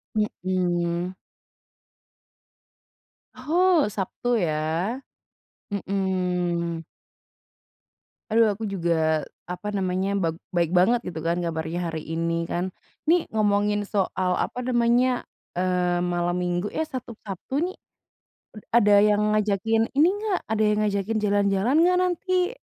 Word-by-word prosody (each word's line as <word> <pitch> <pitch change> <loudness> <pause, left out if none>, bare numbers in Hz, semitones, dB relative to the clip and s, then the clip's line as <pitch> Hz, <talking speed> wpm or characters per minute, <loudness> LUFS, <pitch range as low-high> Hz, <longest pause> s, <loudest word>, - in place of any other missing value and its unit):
Mhm. 180 -3 -1 2.2
Oh, 330 +5 +3
Sabtu 215 +4 -2
ya, 165 - -1 0.7
mhm. 180 -4 -1 1.5
Aduh, 225 +1 +5
aku 220 +3 -6
juga, 165 -4 +1 0.2
apa 180 +4 -4
namanya, 190 0 -1
bak 165 -2 0 0.2
baik 170 -2 +1
banget 230 +7 +4
gitu 165 -3 -5
kan 170 +1 0
kabarnya 170 +1 -2
hari 160 -1 -5
ini 165 0 -1
kan. 175 +1 -2 0.4
Nih 340 +1 +4
ngomongin 205 -1 +2
soal, 185 -3 0
apa 250 - -5
namanya, 245 +1 +2 0.3
eee, 180 -1 +1
malam 175 0 0
Minggu 180 +2 -1
eh, 315 - -2
satu 255 -6 -7
Sabtu 195 +5 -7
nih, 370 +1 -4 0.8
ad 215 - -10 0.2
ada 210 -3 +6
yang 210 0 +3
ngajakin 215 +2 +1
ini 305 +4 +6
nggak, 420 -4 0
ada 215 0 +1
yang 210 0 +2
ngajakin 205 +2 -1
jalan-jalan 205 +5 +2
nggak 360 +1 +4
nanti? 365 +2 0
195 Hz, 115 wpm, -25 LUFS, 175-225 Hz, 2.2 s, ada